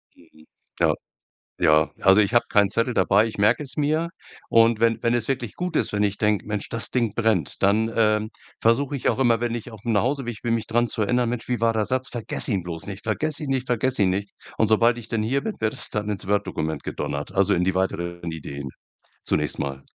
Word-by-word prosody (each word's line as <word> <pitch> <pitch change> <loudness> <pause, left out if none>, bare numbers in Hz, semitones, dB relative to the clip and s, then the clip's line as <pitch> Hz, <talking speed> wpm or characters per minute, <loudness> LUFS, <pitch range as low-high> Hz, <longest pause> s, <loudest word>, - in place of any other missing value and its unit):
Mhm, 85 - -21 0.5
ja. - - +3 0.6
Ja. 75 0 +3
Also, 95 +2 +5
ich 105 +3 +1
habe 120 0 +4
keinen 100 -1 +3
Zettel 115 +3 +1
dabei, 100 +3 +3
ich 110 - -7
merke 105 +8 +3
es 135 -3 -4
mir. 155 +3 0 0.4
Und 115 -1 +4
wenn 115 -1 +2
wenn 120 0 +1
es 120 -2 -1
wirklich 125 -5 -3
gut 180 -1 -3
ist, - - 0
wenn 105 0 0
ich 100 -1 0
denke: 105 -1 +1
„Mensch, 105 -1 -3
das 115 0 +3
Ding 115 -5 0
brennt." 110 -11 0
Dann, 110 +3 +2
ähm, 110 -1 +1 0.3
versuche 140 +5 +1
ich 130 - -1
auch - - 0
immer, 115 -3 +3
wenn 120 -1 -1
ich 120 0 -6
aufm 110 +1 -4
Nachhauseweg 120 +1 -1
bin, 115 -1 0
mich 115 - -2
dran 120 +1 +1
zu 110 - -2
erinnern: 120 +3 +1
„Mensch, 120 0 -4
wie 125 -2 -1
war 115 0 +3
der 110 -1 0
Satz? 130 +4 -1
Vergiss 120 0 0
ihn 100 -6 0
bloß 85 0 -5
nicht. 100 +1 -7
Vergiss 145 +8 +2
ihn 150 -3 -4
nicht, 130 -1 -1
vergiss 125 +1 +1
ihn 95 -2 +4
nicht." 100 +1 -3 0.3
Und 110 - +3
sobald 115 +3 +3
ich 115 -1 -9
dann 110 -2 -1
hier 135 +5 0
bin, 220 - -4
wird 110 0 0
es - - +4
dann 105 0 -3
ins 100 -3 -3
Word 100 +1 0
Dokument 80 0 -3
gedonnert. 70 0 -4
Also, 100 -1 +2
in 90 - +1
die 95 0 0
weiteren 85 -2 -2
Ideen. 70 -3 -7 0.5
Zunächst - - 0
mal. 70 -1 -4
110 Hz, 230 wpm, -23 LUFS, 100-120 Hz, 0.6 s, Also